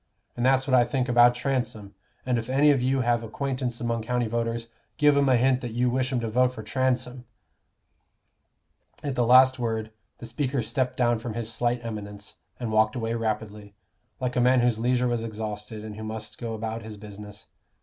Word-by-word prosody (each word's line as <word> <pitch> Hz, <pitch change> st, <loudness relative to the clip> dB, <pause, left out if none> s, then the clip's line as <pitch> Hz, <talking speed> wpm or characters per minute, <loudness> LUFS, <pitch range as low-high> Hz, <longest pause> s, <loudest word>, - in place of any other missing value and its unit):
And 120 Hz, -, -3 dB
that's 130 Hz, +1 st, +3 dB
what 135 Hz, -, -2 dB
I 125 Hz, -1 st, +7 dB
think 125 Hz, +1 st, -1 dB
about 120 Hz, 0 st, +5 dB
Transome. 120 Hz, -6 st, -3 dB, 0.3 s
And 125 Hz, -2 st, +1 dB
if 115 Hz, -, -7 dB
any 145 Hz, +3 st, +5 dB
of 135 Hz, -3 st, +2 dB
you 130 Hz, +1 st, +1 dB
have 120 Hz, -1 st, +1 dB
acquaintance 125 Hz, +1 st, -3 dB
among 115 Hz, -1 st, -1 dB
county 125 Hz, +2 st, -1 dB
voters, 115 Hz, 0 st, -2 dB, 0.3 s
give 150 Hz, -2 st, +5 dB
'em 140 Hz, -1 st, +3 dB
a 130 Hz, -, +5 dB
hint 130 Hz, +1 st, +2 dB
that 120 Hz, -2 st, -5 dB
you 125 Hz, +1 st, +1 dB
wish 130 Hz, +1 st, 0 dB
'em 125 Hz, -, 0 dB
to 115 Hz, -, -2 dB
vote 125 Hz, +3 st, +2 dB
for 110 Hz, -, -8 dB
Transome." 125 Hz, +1 st, -1 dB, 1.8 s
At 140 Hz, -, -2 dB
the 125 Hz, -, +1 dB
last 130 Hz, +1 st, +6 dB
word, 110 Hz, -2 st, -2 dB, 0.3 s
the -, -, -9 dB
speaker 125 Hz, +1 st, -2 dB
stepped 125 Hz, +3 st, -2 dB
down 120 Hz, -2 st, +2 dB
from 115 Hz, -1 st, -6 dB
his 115 Hz, -1 st, -2 dB
slight 120 Hz, 0 st, -1 dB
eminence, 105 Hz, -3 st, -7 dB, 0.2 s
and 120 Hz, -3 st, -3 dB
walked 110 Hz, +1 st, +3 dB
away 115 Hz, -2 st, -2 dB
rapidly, 105 Hz, -2 st, -4 dB, 0.4 s
like 125 Hz, -1 st, -2 dB
a 125 Hz, -, +2 dB
man 125 Hz, 0 st, +4 dB
whose 120 Hz, -2 st, +1 dB
leisure 125 Hz, +1 st, +1 dB
was 120 Hz, -2 st, -1 dB
exhausted, 105 Hz, -1 st, -6 dB
and 105 Hz, -1 st, -7 dB
who 110 Hz, -, -7 dB
must 110 Hz, 0 st, -7 dB
go 115 Hz, -1 st, -4 dB
about 110 Hz, +1 st, -4 dB
his 110 Hz, -1 st, -9 dB
business. 105 Hz, +1 st, -10 dB
120 Hz, 200 wpm, -26 LUFS, 110-125 Hz, 1.8 s, I